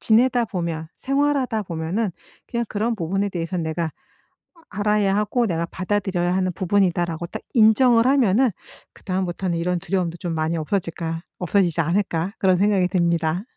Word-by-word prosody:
지내다 240 +2 +3
보면 170 -5 -3
생활하다 275 -5 0
보면은 175 +5 -2 0.4
그냥 235 0 -2
그런 225 +3 -1
부분에 195 +2 -1
대해서는 170 -2 -3
'내가 160 +1 -2 0.6
아 335 - -22 0.2
알아야 205 -1 +2
하고 220 +3 +1
내가 170 -2 -1
받아들여야 185 -1 -1
하는 185 -1 0
부분이다.'라고 175 -3 0
딱 - - -7
인정을 230 +1 +5
하면은 255 -2 +4 0.4
그 - - -20
다음부터는 185 -2 -2
'이런 175 0 -1
두려움도 175 -3 -2
좀 170 -2 -3
많이 160 +1 -1
없어질까 165 -1 -3 0.2
없어지지 180 -2 +1
않을까?' 175 +1 0
그런 185 -2 +3
생각이 200 -2 +3
듭니다. 170 -1 +1
185 Hz, 385 characters per minute, -22 LUFS, 170-210 Hz, 0.6 s, 인정을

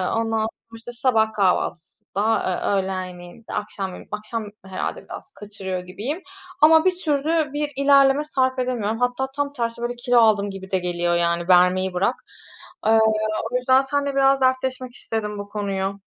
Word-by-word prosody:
ondan 225 0 0
sonra 220 - 0 0.3
işte 230 +2 -9
sabah 225 -3 +1
kahvaltısında, 200 +2 0
eee, 185 +1 -1
öğlen 190 -1 -1
yemeğinde, 180 +4 -11
akşam, 205 -2 -3
yemeğinde, 185 - -11
akşam 215 +1 -5 0.2
herhâlde 190 -1 -4
biraz - - -10
kaçırıyor 200 -3 -5
gibiyim. 215 - -5 0.4
Ama 320 +2 +7
bir 370 - +4
türlü 300 0 +1
bir 295 0 -2
ilerleme 275 +1 +4
sarf 260 -3 0
edemiyorum. 235 -3 -1
Hatta 245 +2 0
tam 285 0 -2
tersi 235 -3 -3
böyle 240 0 -2
kilo 245 0 +1
aldım 210 -3 +4
gibi 190 -1 -9
de 190 - +2
geliyor, 175 -1 0
yani, 170 0 0
vermeyi 185 +1 +4
bırak. 195 +7 +1 0.7
Eee, 225 0 +5 0.5
o - - -3
yüzden 260 +1 +4
seninle 280 0 -2
biraz 270 0 +4
dertleşmek 255 -1 0
istedim 210 -3 -4
bu 205 0 -7
konuyu. 200 -1 -3
225 Hz, 160 wpm, -22 LUFS, 190-260 Hz, 0.7 s, Ama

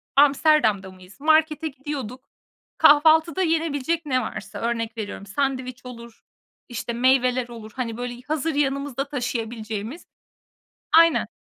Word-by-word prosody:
Amsterdam'da 275 -9 +3
mıyız? 185 +1 -17
Markete 315 +1 +2
gidiyorduk. 270 -4 -6 0.6
Kahvaltıda 315 +2 +5
yenebilecek 325 -1 -1
ne 255 -3 +1
varsa, 220 - -7
örnek 230 -1 -3
veriyorum, 205 -2 -6
sandviç 255 +2 -3
olur, 235 -2 -11 0.5
işte, 240 0 -4
meyveler 255 0 +2
olur, 225 -2 -10
hani, 235 -3 -4
böyle, 245 0 -6
hazır 310 0 -1
yanımızda 275 -1 -1
taşıyabileceğimiz 230 - -5 0.9
Aynen. 335 0 +5
255 Hz, 110 wpm, -23 LUFS, 235-295 Hz, 0.9 s, Kahvaltıda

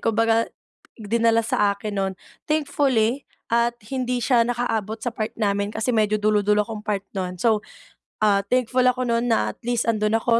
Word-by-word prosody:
kung 225 -1 0
baga, 230 0 +2 0.5
dinala 230 +1 +1
sa 205 -2 +1
akin 210 0 -5
no'n. 195 -1 -1 0.4
Thankfully, 275 -5 +1 0.2
at 235 0 +2 0.2
hindi 250 -1 -1
siya 240 -1 +3
nakaabot 225 -3 -1
sa 235 +1 -3
part 215 -1 -3
namin, 200 -2 0
kasi 235 +3 0
medyo 215 -1 +2
dulo-dulo 210 0 +2
akong 220 -1 -6
part 205 -2 -2
no'n 185 -2 -4
so, 215 +2 +2 0.6
ah, 200 -2 +4
thankful 255 +2 +1
ako 250 0 +2
no'n 235 0 0
na 230 - +1
at - - -22
least 240 -1 +1
andun 215 -1 +1
ako 230 +1 +2
225 Hz, 175 wpm, -23 LUFS, 210-240 Hz, 0.6 s, ah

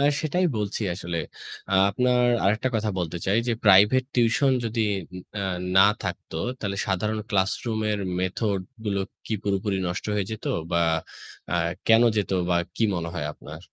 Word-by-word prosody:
আ - - +2 0.2
সেটাই 175 +4 0
বলছি 105 +1 -2
আসলে। 85 -1 -5 0.7
আপনার 125 +3 +2 0.2
আরেকটা 110 +6 +2
কথা 110 -1 0
বলতে 85 -1 -2
চাই 100 +4 +3
যে 120 - +3
প্রাইভেট 105 +6 +6
টিউশন 130 +3 +3
যদি 115 0 -1 0.3
উম 90 - -7 0.2
আ - - -2 0.3
না 95 - +9 0.2
থাকতো, - - -5 0.2
তাহলে 100 -3 -3
সাধারণ 105 +3 -1
ক্লাসরুমের 105 +2 0 0.2
মেথড 95 +2 -1 0.2
গুলো 100 -2 0 0.3
কি 110 - -1
পুরোপুরি 100 0 0
নষ্ট 90 - -4
হয়ে 100 -2 0
যেত 110 - -6 0.3
বা 85 - +2 0.7
আ - - 0 0.3
কেনো 115 +1 +6
যেত 105 - 0 0.2
বা 90 - +3 0.2
কি 115 - +2
মনে 85 -1 -3
হয় 85 -4 -2
আপনার? 75 +2 -11
105 Hz, 155 wpm, -25 LUFS, 95-115 Hz, 0.7 s, না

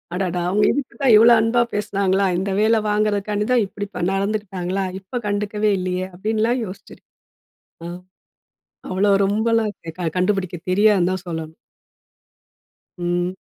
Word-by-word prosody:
அடடா 180 -1 -1
அவுங்க 205 +3 +2
இதுக்கு 265 -3 -4
தான் 265 -4 +5
இவ்ளோ 230 +2 +7
அன்பா 235 +2 +2
பேசினாங்களா? 200 -1 0
இந்த 195 +2 -2
வேலை 220 +1 +3
வாங்குறதுக்காண்டி 210 0 0
தான், 245 -3 +4
இப்டி 205 +1 -6
பன் 180 +1 0
நடந்துருக்காங்களா? 195 -2 -2
இப்ப 195 +6 -5
கண்டுக்கவே 210 +1 0
இல்லயே, 185 0 -2
அப்படின்லாம் 220 +5 0
யோசிச்சேன். 185 - -12 0.8
அ - - -5 1.0
அவ்வளோ 195 +2 +2
ரொம்பல்லாம் 220 +2 +1 0.3
க 175 - -1
கண்டுபிடிக்கத் 185 -2 -1
தெரியாதுன்னு 200 -2 +4
தான் 185 0 -4
சொல்லணும். 160 -1 -5 1.4
ம். 175 +1 -1
200 Hz, 125 wpm, -21 LUFS, 185-215 Hz, 1.4 s, இவ்ளோ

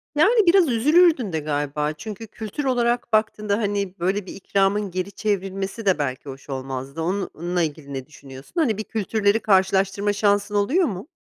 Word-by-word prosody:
Yani, 420 +7 +4
biraz 355 -2 +6
üzülürdün 275 - +4
de 160 - 0
galiba. 150 0 -2
Çünkü 215 +6 -8
kültür 220 +6 -6
olarak 240 -2 0
baktığında, 215 -1 +1
hani, 200 -3 -2
böyle 190 +3 0
bir - - -8
ikramın 195 0 0
geri 185 +2 -3
çevrilmesi 195 +1 -3
de 185 -5 +3
belki 135 0 -3
hoş 135 +1 -10
olmazdı. 135 +3 -5
Onunla 175 -1 -2
ilgili 150 -3 -4
ne 130 -1 -5
düşünüyorsun? 135 - -13
Hani, 225 -9 +1
bir 215 - -3
kültürleri 215 0 0
karşılaştırma 195 0 +2
şansın 205 0 +1
oluyor 275 - +3
mu? 195 +5 -6
200 Hz, 160 wpm, -23 LUFS, 165-220 Hz, -, biraz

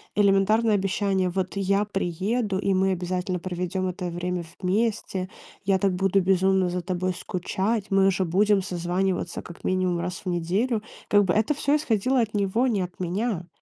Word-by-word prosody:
элементарное 205 +2 +3
обещание: 195 -1 0
"Вот 185 +1 -2
я 195 +1 +1
приеду, 195 +2 -1
и 195 0 +1
мы 190 +1 +2
обязательно 180 0 -2
проведём 180 +1 -3
это 180 0 -4
время 175 +1 -3 0.2
вместе, 195 -1 -1 0.4
я 190 -1 +3
так 195 -1 +2
буду 195 +1 +2
безумно 190 0 +3
за 180 0 -2
тобой 185 +1 -1
скучать, 190 +4 -2
мы 195 0 +4
же 190 0 0
будем 200 +4 +3
созваниваться 180 0 -2
как 170 - -12
минимум 185 -2 0
раз 180 +1 -4
в - - -6
неделю". 195 +7 0 0.2
Как 205 -1 +4
бы 175 - +1
это 220 +8 +2
всё 285 0 +2
исходило 255 -2 +1
от 220 -2 -2
него, 205 +5 +1
не 215 -6 +1
от 180 0 -8
меня. 185 0 -2
190 Hz, 170 wpm, -25 LUFS, 180-205 Hz, 0.4 s, мы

